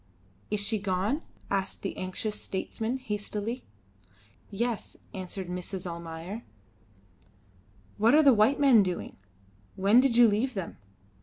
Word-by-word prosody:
"Is 210 - 0
she 210 +1 +1
gone?" 200 - 0 0.3
asked 195 -1 -1
the 195 - -3
anxious 185 +3 -3
statesman, 220 +5 -3
hastily. 215 0 -4 0.8
"Yes," 230 +2 -3 0.2
answered 185 -1 -5
Mrs. 180 +1 -5
Almayer. 170 +4 -6 1.6
"What 225 +6 +5
are 310 - +6
the 275 -3 +7
white 220 +6 +4
men 265 -6 +7
doing? 180 -3 -3 0.6
When 200 +5 +5
did 255 -3 +3
you 240 -1 +8
leave 225 +4 0
them?" 190 -4 -5
205 Hz, 125 wpm, -29 LUFS, 190-235 Hz, 1.6 s, you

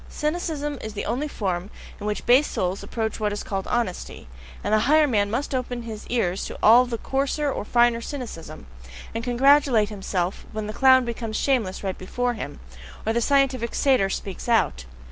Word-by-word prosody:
Cynicism 300 -3 -2
is 220 - -6
the 205 - -3
only 250 +7 -1
form 190 -7 -3 0.3
in 210 - -5
which 210 - -3
base 255 +5 +5
souls 185 +1 -2
approach 220 -1 -3
what 210 -1 0
is 205 - -4
called 195 -1 -4
honesty; 230 - -3 0.4
and - - -1
the 215 - +5
higher 310 0 +6
man 205 -7 +1
must 260 +6 -2
open 245 -2 -3
his 220 -2 -8
ears 195 -6 0
to - - -7
all 240 +3 +7
the 235 -1 -3
coarser 275 +4 -1
or - - -3
finer 235 +1 +3
cynicism, 225 - -7 0.5
and 230 +1 -3
congratulate 250 -3 +4
himself 190 -3 -3
when 215 0 -3
the 215 - -5
clown 260 0 +5
becomes 230 -2 -4
shameless 230 -10 0
right 190 -1 -3
before 245 +6 -1
him, 135 - -7 0.5
or 220 - +1
the 235 - +1
scientific 265 -3 +1
satyr 260 -8 +3
speaks 195 +3 -5
out. 65 - +2
235 Hz, 185 wpm, -24 LUFS, 205-260 Hz, 0.5 s, all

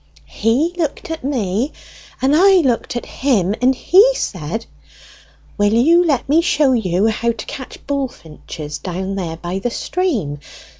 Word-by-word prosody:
"He 255 +11 0
looked 320 0 -3
at 320 - -5
me, 245 -1 -1 0.5
and 275 +3 +4
I 385 +4 +6
looked 245 -4 -1
at 240 - -3
him, 210 -9 0
and 260 +1 +4
he 415 - +5
said, 180 - -4 0.9
'Will 205 +1 +3
you 330 +9 +5
let 285 -8 0
me 305 +4 +4
show 295 -5 +2
you 195 -5 +1
how 225 +1 0
to 220 - -8
catch 260 - -9
bullfinches 165 - -5
down 190 +1 -4
here 170 -4 -4
by 175 +3 -4
the 245 - -2
stream?' 230 - -2
240 Hz, 150 wpm, -18 LUFS, 190-290 Hz, 0.9 s, I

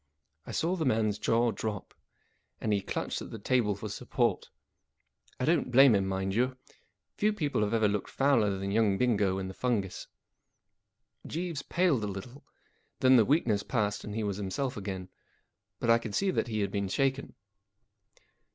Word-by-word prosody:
I - - -5
saw 175 +3 0
the 165 - -2
man's 110 -5 +1
jaw 115 +2 +2
drop, 105 -1 -5 0.7
and 110 - 0
he 100 - +1
clutched - - -3
at - - -7
the - - -7
table 110 -1 +1
for 105 +2 -6
support. 100 - -1 0.9
I 125 - 0
don't 160 -4 +2
blame 135 0 +7
him, 100 -2 +2
rrtind 95 0 -2
you. 125 +4 0 0.6
Few 210 +1 +2
people 150 - -1
have 105 -1 0
ever 110 -2 +3
looked 100 -1 -2
fouler 115 -8 +2
than 100 +1 -3
young 105 -2 +2
Bingo 105 -6 +2
in 95 -1 -3
the 95 - -7
fungus. 105 -5 -2 1.2
Jeeves 165 -3 -3
paled 170 -8 +1
a - - -1
little; 100 +8 -8 0.6
then 130 0 +6
the 115 -4 +6
weakness 120 -8 +2
passed 105 -4 -1
and 105 - -6
he 110 - -1
was 100 -2 -2
himself 105 +7 -3
again. 95 -2 -5 0.7
But 115 - +2
I 115 - +5
could 110 -3 -6
see 195 -1 +2
that - - -1
he 110 -2 -2
had 100 -1 -1
been 100 -1 -1
shaken. 135 +7 -1
110 Hz, 175 wpm, -30 LUFS, 100-130 Hz, 1.2 s, blame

